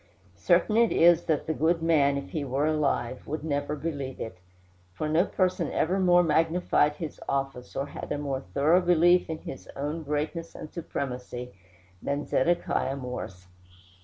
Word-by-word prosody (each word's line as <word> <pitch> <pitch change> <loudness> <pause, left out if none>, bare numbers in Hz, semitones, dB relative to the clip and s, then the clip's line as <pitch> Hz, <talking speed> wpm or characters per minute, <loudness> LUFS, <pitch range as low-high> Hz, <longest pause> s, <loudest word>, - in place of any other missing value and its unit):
Certain 215 - +3
it 230 -1 +4
is 170 0 +5
that 155 -3 0
the 160 - -1
good 165 +2 +1
man, 145 -4 +3
if 140 - -6
he 155 - -2
were 135 +2 0
alive, 140 -5 -1
would 155 +1 -4
never 145 -1 -1
believe 140 -3 -4
it; 100 -5 -6 0.6
for 155 - -2
no 160 +4 +3
person 180 -5 0
ever 185 +4 +1
more 175 -1 +5
magnified 160 -2 +2
his 160 -1 -6
office, 135 -2 -3
or 135 - -1
had 140 - -8
a - - 0
more 140 -2 -2
thorough 145 - +2
belief 175 0 +4
in 160 - -3
his 135 - -9
own 150 +4 -3
greatness 155 +3 -3
and 155 - -9
supremacy, 125 -6 -5 0.5
than 140 +1 -2
Zedekiah 135 -2 +1
Morse. 125 -8 -6
150 Hz, 160 wpm, -27 LUFS, 140-165 Hz, 0.6 s, is